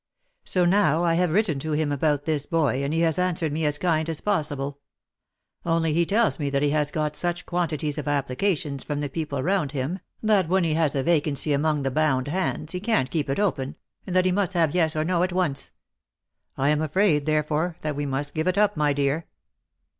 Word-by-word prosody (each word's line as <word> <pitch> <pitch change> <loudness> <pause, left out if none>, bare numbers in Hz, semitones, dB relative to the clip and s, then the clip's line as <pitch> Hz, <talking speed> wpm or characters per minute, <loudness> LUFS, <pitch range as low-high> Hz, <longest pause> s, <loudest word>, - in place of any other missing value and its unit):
So 180 -2 +2
now, 175 -4 +3
I 170 -1 +2
have 175 +1 +2
written 170 -4 +1
to 155 +2 -3
him 150 -1 0
about 145 0 0
this 150 -3 -1
boy, 145 -5 +1
and 140 - -1
he 165 +1 +1
has 165 0 +1
answered 175 -4 0
me 155 +1 0
as 150 0 -1
kind 160 -1 0
as 160 - -3
possible; 145 -7 -2 0.8
only 165 -2 +1
he 170 +1 +2
tells 220 -2 +2
me 145 -2 -1
that 140 +1 0
he 145 - +2
has 150 -1 +1
got 150 -1 -2
such 175 +1 -3
quantities 155 -4 -2
of 145 - -6
applications 145 +1 -1
from 145 -1 -3
the 145 - -2
people 140 -2 -3
round 180 -5 0
him, 145 +7 -2 0.2
that 205 -6 +3
when 190 0 +3
he 160 -2 +1
has 155 -3 +1
a 135 - 0
vacancy 150 -2 +1
among 150 0 +1
the 135 - -1
bound 145 -2 +1
hands, 165 -2 -2
he 180 - -3
can't 210 - 0
keep 150 -4 -1
it 135 - -1
open, 140 -10 -1 0.3
and 185 - -3
that 185 0 +4
he 185 - +3
must 195 0 0
have 165 -4 +2
yes 160 -3 +2
or 155 - +1
no 175 +1 +1
at 180 +1 +1
once. 175 -7 -1 0.9
I 135 +2 +2
am 150 0 +2
afraid, 155 -2 +2
therefore, 155 +2 0
that 150 -2 -2
we 145 0 -2
must 140 +2 -2
give 160 +2 -1
it 185 +1 +1
up, 210 0 +3
my 150 -2 +2
dear." 140 +3 -1
155 Hz, 220 wpm, -25 LUFS, 145-175 Hz, 0.9 s, that